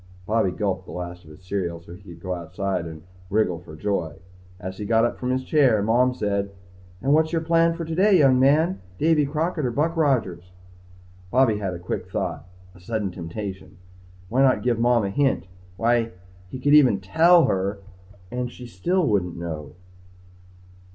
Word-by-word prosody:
_ -, -, -22 dB
Bobby 110 Hz, -2 st, +1 dB
gulped 95 Hz, 0 st, -3 dB
the -, -, -9 dB
last 90 Hz, -1 st, -7 dB
of -, -, -15 dB
his 75 Hz, +4 st, -15 dB
cereal 90 Hz, -3 st, -3 dB
so 85 Hz, 0 st, -13 dB
he 90 Hz, -, -13 dB
could 90 Hz, -4 st, -12 dB
go 95 Hz, -1 st, -3 dB
outside 90 Hz, +1 st, -3 dB
and 80 Hz, -1 st, -10 dB, 0.3 s
wriggle 100 Hz, -5 st, +1 dB
for 80 Hz, -3 st, -12 dB
joy. 80 Hz, -4 st, -2 dB, 0.4 s
As 95 Hz, +1 st, -7 dB
he -, -, -4 dB
got 115 Hz, +2 st, +3 dB
up 120 Hz, -, -3 dB
from 125 Hz, -, -3 dB
his 130 Hz, +1 st, 0 dB
chair, 130 Hz, -9 st, +3 dB
Mom 125 Hz, +4 st, +2 dB
said, 100 Hz, -3 st, -1 dB, 0.5 s
"And 140 Hz, -, +3 dB
what's 160 Hz, +1 st, +3 dB
your 165 Hz, -1 st, 0 dB
plan 165 Hz, 0 st, +3 dB
for 165 Hz, -1 st, -5 dB
today, 185 Hz, +5 st, +3 dB
young 135 Hz, -5 st, +5 dB
man? 155 Hz, +7 st, +3 dB, 0.2 s
Davy 155 Hz, -, +3 dB
Crockett 155 Hz, +2 st, -1 dB
or 125 Hz, -, +1 dB
Buck 155 Hz, +7 st, 0 dB
Rogers?" 100 Hz, -, 0 dB, 0.8 s
Bobby 120 Hz, -2 st, +3 dB
had 95 Hz, -3 st, -3 dB
a -, -, -5 dB
quick 90 Hz, -, -5 dB
thought -, -, -3 dB, 0.3 s
a 90 Hz, -, -17 dB
sudden 105 Hz, +1 st, -3 dB
temptation. 95 Hz, +1 st, -7 dB, 0.5 s
Why 125 Hz, +8 st, +1 dB
not 135 Hz, -1 st, +3 dB
give 120 Hz, -2 st, +1 dB
Mom 120 Hz, -2 st, +3 dB
a 100 Hz, -, -2 dB
hint? 135 Hz, +1 st, +1 dB, 0.3 s
Why 115 Hz, 0 st, +1 dB, 0.4 s
he -, -, -6 dB
could 145 Hz, +3 st, +2 dB
even 130 Hz, -10 st, +6 dB
tell 165 Hz, -, +5 dB
her 100 Hz, -3 st, -1 dB, 0.5 s
and 125 Hz, 0 st, -3 dB
she 125 Hz, -, -11 dB
still 175 Hz, +8 st, 0 dB
wouldn't 90 Hz, -, 0 dB
know. 80 Hz, -2 st, -6 dB
110 Hz, 185 wpm, -24 LUFS, 90-140 Hz, 0.8 s, even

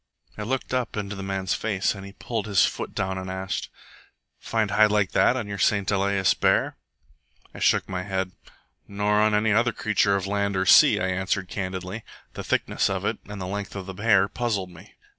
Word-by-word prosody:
I -, -, -7 dB
looked 130 Hz, +4 st, -3 dB
up 125 Hz, -3 st, -1 dB
into 105 Hz, 0 st, -4 dB
the 95 Hz, -, -7 dB
man's 95 Hz, -1 st, -2 dB
face, 100 Hz, -3 st, 0 dB
and 100 Hz, -2 st, -9 dB
he 100 Hz, 0 st, -10 dB
pulled 110 Hz, -1 st, -4 dB
his 100 Hz, -3 st, +4 dB
foot -, -, -5 dB
down 95 Hz, 0 st, -2 dB
and 95 Hz, 0 st, -6 dB
asked, 95 Hz, 0 st, -4 dB, 0.7 s
"Find 110 Hz, -3 st, -1 dB
hide 110 Hz, 0 st, +5 dB
like 105 Hz, -2 st, +1 dB
that 130 Hz, -, +3 dB
on 120 Hz, -, -3 dB
your 100 Hz, -1 st, -5 dB
St 100 Hz, +2 st, +2 dB
Elias 100 Hz, -1 st, +2 dB
bear?" -, -, +1 dB, 0.8 s
I -, -, -10 dB
shook -, -, +2 dB
my 90 Hz, -1 st, -3 dB
head. 95 Hz, -1 st, -3 dB, 0.6 s
"Nor 105 Hz, +1 st, +1 dB
on 105 Hz, 0 st, +3 dB
any 105 Hz, +1 st, +2 dB
other 120 Hz, +3 st, +3 dB
creature 105 Hz, -2 st, +1 dB
of 95 Hz, -1 st, -1 dB
land 100 Hz, 0 st, -1 dB
or 95 Hz, -, +1 dB
sea," -, -, +7 dB
I 95 Hz, -, 0 dB
answered 95 Hz, 0 st, -1 dB
candidly. 95 Hz, +2 st, -5 dB, 0.3 s
The -, -, -6 dB
thickness -, -, 0 dB
of -, -, -2 dB
it, -, -, -1 dB
and 105 Hz, -1 st, -7 dB
the 95 Hz, -, -4 dB
length 100 Hz, +2 st, -5 dB
of 100 Hz, -2 st, -5 dB
the 95 Hz, -, -7 dB
hair, 105 Hz, -3 st, +4 dB
puzzled 105 Hz, -6 st, -2 dB
me. 85 Hz, -1 st, -15 dB
100 Hz, 205 wpm, -25 LUFS, 95-105 Hz, 0.8 s, sea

